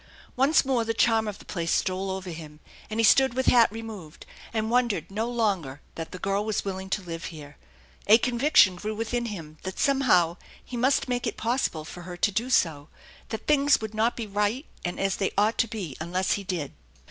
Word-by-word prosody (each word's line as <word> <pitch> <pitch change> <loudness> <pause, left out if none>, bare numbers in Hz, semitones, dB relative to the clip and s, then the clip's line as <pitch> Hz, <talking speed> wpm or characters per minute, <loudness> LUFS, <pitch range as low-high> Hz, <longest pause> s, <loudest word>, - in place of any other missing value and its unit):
Once 275 +4 +4
more 260 -3 +1
the 225 0 -2
charm 225 -1 +3
of 205 -1 -4
the - - -15
place 170 -3 -3
stole 190 +1 0
over 190 -1 -4
him; 155 -2 -10 0.3
and 215 +1 -3
he - - +3
stood 265 +3 +5
with 260 0 0
hat 235 -3 +5
removed, 215 -8 -9 0.3
and 220 0 -1
wondered 240 -5 +1
no 220 +4 -2
longer 195 - -1
that 165 -1 -7
the - - -6
girl 195 +2 -1
was 215 -2 -2
willing 190 -1 -4
to 195 +1 -1
live 165 -1 -6
here. 145 -2 -9 0.5
A 215 +2 +8
conviction 240 -5 +4
grew 215 +3 -4
within 230 +2 -2
him 160 -8 -7
that 190 0 -6
somehow 225 - +3 0.3
he 250 - -7
must 260 +4 +2
make 245 -1 -1
it - - -3
possible 225 - -1
for 175 - -9
her 175 0 -8
to 205 - +2
do 230 +6 -1
so, 155 - +1 0.4
that 220 -1 -5
things 285 -1 +4
would 220 -1 -6
not 225 +2 +1
be 230 - -3
right 210 +7 -1 0.2
and 175 - -3
as 195 -1 0
they 195 - 0
ought 210 +3 +2
to 230 - +3
be 200 - -6
unless 180 +3 -1
he 200 - 0
did. 175 -7 -4
210 Hz, 210 wpm, -26 LUFS, 180-235 Hz, 0.5 s, A